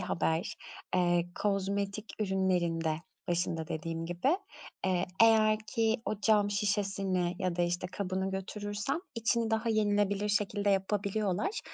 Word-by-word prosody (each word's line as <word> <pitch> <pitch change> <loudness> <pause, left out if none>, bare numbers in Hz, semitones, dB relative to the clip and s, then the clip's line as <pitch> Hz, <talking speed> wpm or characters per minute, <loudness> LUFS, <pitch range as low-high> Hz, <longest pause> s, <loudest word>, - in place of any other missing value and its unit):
haber. 170 -2 -1 0.4
Eee, 175 -1 +2
kozmetik 200 +1 -1
ürünlerinde, 180 -5 +1 0.4
başında 170 -2 -1
dediğim 165 +1 -3
gibi, 180 - +1 0.5
eee, 180 -1 +1 0.2
eğer 215 -1 +6
ki 225 +1 +1
o 215 -1 -3
cam 205 -1 +4
şişesini 195 -3 0
ya 185 -2 -1
da, 175 - +2
işte, 175 +1 -1
kabını 190 0 -2
götürürsem 205 - -3 0.2
içini 230 0 +1
daha 225 +1 +1
yenilebilir 205 -1 +2
şekilde 205 0 +1
yapabiliyorlar. 200 - 0
195 Hz, 120 wpm, -31 LUFS, 180-210 Hz, 0.5 s, eğer